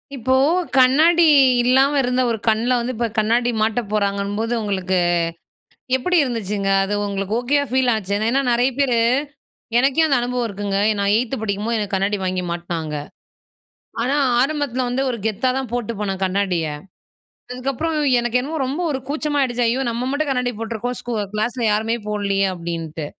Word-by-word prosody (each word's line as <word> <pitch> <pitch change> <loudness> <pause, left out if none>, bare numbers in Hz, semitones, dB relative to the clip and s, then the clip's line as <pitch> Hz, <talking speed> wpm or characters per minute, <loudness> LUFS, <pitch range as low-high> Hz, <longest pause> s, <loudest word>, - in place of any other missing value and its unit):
இப்போ, 260 +1 0 0.4
கண்ணாடி 310 +7 +5 0.4
இல்லாம 265 +3 +4
இருந்த 250 0 0
ஒரு 225 - -1
கண்ல 225 +3 +2
வந்து 240 +2 -3
இப்போ 235 +1 -1
கண்ணாடி 235 +3 +2
மாட்ட 220 +2 +1
போறாங்கன்னும்போது, 205 +2 -1
உங்களுக்கு 190 -2 -1 1.0
எப்டி 360 +8 +1
இருந்துச்சுங்க? 210 -6 -2
அது 195 +1 -2
உங்களுக்கு 200 0 -3
ஓகேயா 285 +4 +1
ஃபீல் 260 0 +2
ஆச்சு. 200 -3 -3 0.2
ஏன்னா 270 +3 +2
நிறைய 245 +2 +3
பேரு 250 -4 +2 0.8
எனக்கே 270 +5 +3
அந்த 275 -3 +3
அனுபவம் 245 0 -1
இருக்குங்க. 200 -1 -3 0.2
நான் 200 0 +2
8த் 245 +2 -1
படிக்கும்போது 215 +2 -1
எனக்கு 205 -2 -2
கண்ணாடி 200 +2 0
வாங்கி 185 -1 -1
மாட்டுனாங்க. 170 -3 -4 1.1
ஆனா 270 +3 0 0.3
ஆரம்பத்ல 275 -3 -1
வந்து, 250 +2 -1
ஒரு 240 - -4
கெத்தா 220 +4 0
தான் 265 -4 -4
போட்டு 240 -2 -2
போனேன் 195 -2 -3
கண்ணாடிய. 185 -3 0 0.9
அதுக்கப்புறம் 275 +6 -2 0.2
எனக்கு 240 +1 0
என்னமோ 305 +5 -4
ரொம்ப 285 +7 -3
ஒரு 265 - -2
கூச்சமா 295 0 -1
ஆயிடுச்சு. 245 -2 0
"ஐயோ! 255 +3 0
நம்ம 235 +2 -3
மட்டும் 290 +1 -1
கண்ணாடி 250 -2 0
போட்டுருக்கோம் 230 +2 -4
ஸ்கூ 245 - -6 0.2
கிளாஸ்ல 235 +3 -2
யாருமே 220 +2 0
போடலையே," 200 -2 0
அப்டின்டு. 165 -3 -5
235 Hz, 155 wpm, -20 LUFS, 200-255 Hz, 1.1 s, கண்ணாடி